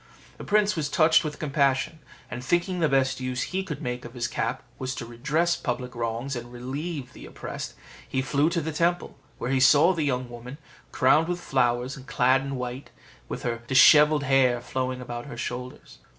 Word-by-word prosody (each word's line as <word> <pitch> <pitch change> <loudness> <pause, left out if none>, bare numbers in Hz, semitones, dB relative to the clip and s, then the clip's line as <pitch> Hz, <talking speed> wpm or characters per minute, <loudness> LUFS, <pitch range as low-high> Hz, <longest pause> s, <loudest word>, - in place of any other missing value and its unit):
The - - -7
prince 210 0 +2
was 150 -3 -2
touched 160 +2 +4
with 150 -1 -4
compassion; 140 0 0 0.3
and 125 +1 -5
thinking 175 +5 0
the 160 -3 +2
best 135 -1 +1
use 130 -1 -2
he 190 +1 -2
could 165 -6 -6
make 125 0 -3
of 120 +2 -10
his 120 -1 -1
cap - - -3 0.2
was 130 0 -3
to 120 - -5
redress 150 +9 0
public 125 -1 -4
wrongs 120 +3 -3
and 120 0 -7
relieve 130 +2 -5
the - - -11
oppressed, - - -7 0.3
he 130 - -1
flew 140 +4 +2
to 170 -1 -1
the 160 +1 -3
temple, 170 +3 0 0.2
where 125 - -3
he 135 - +2
saw 150 +7 +6
the 165 - -2
young 130 -4 -1
woman, 120 +3 -9 0.3
crowned 150 +5 +4
with 175 0 -2
flowers, 125 -4 0
clad 130 +2 +3
in 135 0 -4
white, 125 +1 -5
and - - -26
with - - -5
her 115 -1 -2
dishevelled 150 +3 +6
hair 130 -3 +3
flowing 130 +1 -3
about 120 +1 -6
her - - -8
shoulders. 125 - -6
130 Hz, 195 wpm, -26 LUFS, 125-155 Hz, 0.3 s, saw